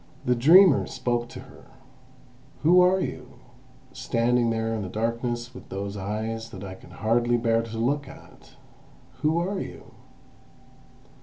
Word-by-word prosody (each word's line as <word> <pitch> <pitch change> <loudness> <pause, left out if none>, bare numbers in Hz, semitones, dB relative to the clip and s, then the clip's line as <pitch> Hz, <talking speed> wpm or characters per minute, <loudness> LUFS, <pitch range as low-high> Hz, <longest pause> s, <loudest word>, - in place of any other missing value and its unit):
The 125 - +3
dreamer 160 +7 +6
spoke 120 -1 -2
to - - -9
her: - - -16 1.0
"Who 175 +4 +6
are 185 +1 +4
you, - - -5 0.6
standing 120 -1 +1
there 115 0 -1
in 110 - -2
the 95 - -5
darkness 120 +3 -3
with 125 - -12
those 100 +1 -5
eyes 110 +3 -4
that 95 - -9
I 95 -1 -7
can 95 - -15
hardly 120 +2 +1
bear 115 -1 +1
to 115 -1 -7
look 140 +5 0
at? - - -15 0.7
Who 155 +2 +2
are 190 +3 -1
you?" - - -9
120 Hz, 145 wpm, -25 LUFS, 110-135 Hz, 1.0 s, dreamer